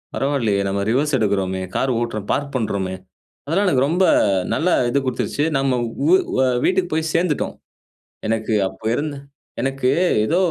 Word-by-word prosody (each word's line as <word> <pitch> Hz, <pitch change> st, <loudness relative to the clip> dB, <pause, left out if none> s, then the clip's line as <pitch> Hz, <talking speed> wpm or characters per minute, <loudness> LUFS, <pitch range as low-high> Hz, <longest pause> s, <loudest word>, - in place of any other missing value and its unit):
பரவாயில்லையே, 130 Hz, -8 st, 0 dB
நம்ம 100 Hz, +1 st, -1 dB
reverse 140 Hz, +5 st, +1 dB
எடுக்கிறோமே, 95 Hz, -4 st, 0 dB
car 135 Hz, -, +1 dB
ஓட்டுறோம் 110 Hz, -4 st, -4 dB
பார்க் 140 Hz, 0 st, -3 dB
பண்ணுறோமே," 100 Hz, -6 st, -1 dB, 0.5 s
அதெல்லாம் 170 Hz, +8 st, +1 dB
எனக்கு 135 Hz, -6 st, +3 dB
ரொம்ப 180 Hz, +4 st, +2 dB, 0.5 s
நல்லா 175 Hz, +3 st, +1 dB, 0.2 s
இது 140 Hz, +3 st, +2 dB
கொடுத்துச்சு. 130 Hz, +3 st, -1 dB
நம்ம 135 Hz, -2 st, +1 dB, 0.3 s
வு 375 Hz, -, +8 dB, 0.5 s
வீட்டுக்கு 180 Hz, -2 st, +1 dB
போய் 160 Hz, 0 st, 0 dB
சேர்ந்துட்டோம், 165 Hz, -3 st, 0 dB, 0.7 s
எனக்கு 110 Hz, 0 st, -1 dB, 0.2 s
அப்போ 95 Hz, +3 st, -15 dB
இருந்த 145 Hz, 0 st, -3 dB, 0.4 s
எனக்கு 135 Hz, -1 st, 0 dB, 0.4 s
ஏதோ 165 Hz, +9 st, +1 dB
135 Hz, 135 wpm, -21 LUFS, 110-150 Hz, 0.7 s, வு